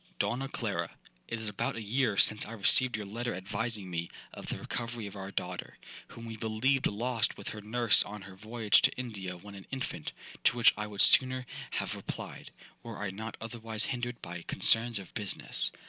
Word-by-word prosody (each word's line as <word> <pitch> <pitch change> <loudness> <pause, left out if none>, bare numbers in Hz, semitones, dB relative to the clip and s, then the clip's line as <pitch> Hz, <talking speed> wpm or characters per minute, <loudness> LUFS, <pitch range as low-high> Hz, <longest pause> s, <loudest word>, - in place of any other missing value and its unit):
'DONNA 135 +3 -1
CLARA, 95 -11 -2 0.4
'It 115 - -3
is 110 - -6
about 105 -2 -2
a 115 - -4
year 110 -1 +1
since 105 +5 +5
I 110 - -7
received 120 +3 +6
your 105 - -5
letter 120 +3 -3
advising 105 +2 -2
me 85 -1 -3 0.2
of - - -9
the - - -2
recovery 120 -2 -4
of 100 0 -8
our 95 -1 -6
daughter, - - -4 0.3
whom 115 - -10
we 115 -1 -6
believed 115 +5 +1
lost 115 +1 0
with - - -6
her 105 - -7
nurse 115 +1 +4
on 105 -1 -4
her 95 -1 -11
voyage 110 +1 +3
to - - +4
India 100 -7 -5
when 100 +3 -11
an 95 -1 -11
infant, 130 - -4 0.3
to - - +4
which 115 -1 +7
I 105 0 -3
would 100 -2 +1
sooner 130 -1 +6 0.2
have - - -2
replied, - - -7 0.3
were 115 -2 -8
I 105 -2 -3
not 110 +2 -6
otherwise 110 -1 -2
hindered 120 -1 -3
by 85 0 -6
concerns 115 +5 +2
of 95 -2 -9
business. 105 -4 +1
110 Hz, 195 wpm, -31 LUFS, 100-120 Hz, 0.4 s, which